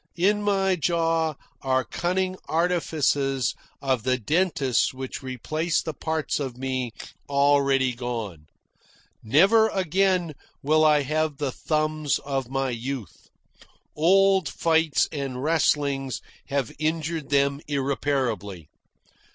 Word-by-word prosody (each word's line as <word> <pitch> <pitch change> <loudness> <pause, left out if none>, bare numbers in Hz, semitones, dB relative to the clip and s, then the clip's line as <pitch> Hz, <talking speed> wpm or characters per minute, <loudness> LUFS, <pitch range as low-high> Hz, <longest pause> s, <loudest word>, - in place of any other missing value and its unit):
In 205 +4 +2
my 195 -2 +2
jaw 165 -2 0 0.3
are 130 -1 +1
cunning 185 +2 -1
artifices 145 -6 +1 0.3
of 130 -3 +1
the 130 +2 +1
dentists 140 - +1
which 130 +1 -6
replace 155 +6 -1
the 160 - -4
parts 160 +1 -2
of 130 -4 -4
me 130 -2 -2 0.4
already 140 -2 +3
gone. 115 -10 -5 0.7
Never 195 - +5
again 185 -2 +1 0.3
will 155 +2 +3
I 150 -2 +4
have 155 +1 -1
the 140 -2 -2
thumbs 155 0 0
of 135 -3 -3
my 135 -1 -1
youth. 120 -4 -6 0.7
Old 190 +2 +4
fights 160 -2 +2
and 135 -4 -4
wrestlings 145 -4 +1 0.3
have 140 -4 -1
injured 155 -1 -2
them 140 0 +2
irreparably. 130 - -2
145 Hz, 110 wpm, -25 LUFS, 130-165 Hz, 0.7 s, Never